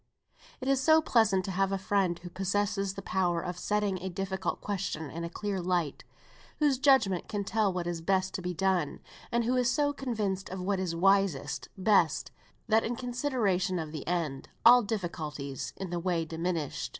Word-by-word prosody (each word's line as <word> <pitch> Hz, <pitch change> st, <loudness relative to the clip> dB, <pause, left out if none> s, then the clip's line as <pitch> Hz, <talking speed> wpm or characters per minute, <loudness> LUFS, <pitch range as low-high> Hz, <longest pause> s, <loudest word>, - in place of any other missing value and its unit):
It 260 Hz, -, -4 dB
is 270 Hz, -1 st, +3 dB
so 315 Hz, +4 st, +6 dB
pleasant 220 Hz, -, +3 dB
to 195 Hz, -, -3 dB
have 195 Hz, +1 st, +1 dB
a 195 Hz, -, +1 dB
friend 190 Hz, -2 st, +1 dB
who 175 Hz, 0 st, -10 dB
possesses 195 Hz, +1 st, -1 dB
the 195 Hz, -, -7 dB
power 180 Hz, -3 st, +1 dB
of 180 Hz, +1 st, -5 dB
setting 205 Hz, -1 st, 0 dB
a 190 Hz, -, -3 dB
difficult 190 Hz, 0 st, -3 dB
question 185 Hz, -6 st, -3 dB
in 170 Hz, +1 st, -5 dB
a 170 Hz, -, -3 dB
clear 195 Hz, +1 st, -3 dB
light; 175 Hz, -5 st, -1 dB, 0.5 s
whose 290 Hz, -4 st, +2 dB
judgment 260 Hz, -10 st, +3 dB
can 205 Hz, -2 st, -2 dB
tell 210 Hz, 0 st, +1 dB
what 180 Hz, -1 st, -3 dB
is 170 Hz, -1 st, -3 dB
best 190 Hz, +2 st, +1 dB
to -, -, -3 dB
be 180 Hz, 0 st, -2 dB
done; 180 Hz, -3 st, 0 dB, 0.3 s
and 235 Hz, 0 st, +2 dB
who 245 Hz, +3 st, +1 dB
is 250 Hz, -1 st, +2 dB
so 290 Hz, +2 st, +1 dB
convinced 215 Hz, -8 st, -2 dB
of 190 Hz, -, -5 dB
what 190 Hz, +1 st, -1 dB
is 180 Hz, -3 st, -2 dB
"wisest, 185 Hz, -6 st, +2 dB
best," 185 Hz, -6 st, +2 dB, 0.4 s
that 220 Hz, 0 st, +4 dB
in 240 Hz, -, -2 dB
consideration 240 Hz, -8 st, 0 dB
of 160 Hz, -3 st, -4 dB
the 155 Hz, -2 st, -7 dB
end, 165 Hz, -6 st, -2 dB, 0.2 s
all 245 Hz, +1 st, +9 dB
difficulties 160 Hz, -, -4 dB
in 190 Hz, -2 st, -5 dB
the 175 Hz, -, -1 dB
way 170 Hz, -2 st, 0 dB
diminish. 165 Hz, -2 st, -3 dB
190 Hz, 185 wpm, -30 LUFS, 175-210 Hz, 0.5 s, all